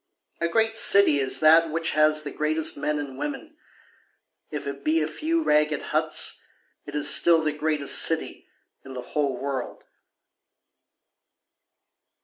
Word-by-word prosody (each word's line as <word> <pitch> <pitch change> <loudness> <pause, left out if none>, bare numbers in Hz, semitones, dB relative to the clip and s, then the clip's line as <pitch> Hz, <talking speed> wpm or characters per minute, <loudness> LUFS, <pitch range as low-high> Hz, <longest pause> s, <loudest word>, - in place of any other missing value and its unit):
A 170 - 0
great 225 +5 0
city 200 -9 +4
is 135 -1 +2
that 160 +1 +5
which 165 +1 -2
has 155 0 +3
the 145 - -6
greatest 155 +2 -1
men 150 +1 -2
and 140 -3 -7
women, 300 +2 -6 0.9
If 150 -2 -6
it 140 0 -7
be 155 +2 +1
a 155 - -1
few 320 - -2
ragged 150 - +1
huts - - -1 0.5
it 145 - -8
is 145 -1 +1
still 165 0 +3
the 155 - 0
greatest 150 -1 -1
city - - -3 0.4
in 135 -1 -11
the 125 - -5
whole 140 -3 -1
world. 135 -2 -5
155 Hz, 140 wpm, -24 LUFS, 145-165 Hz, 0.9 s, that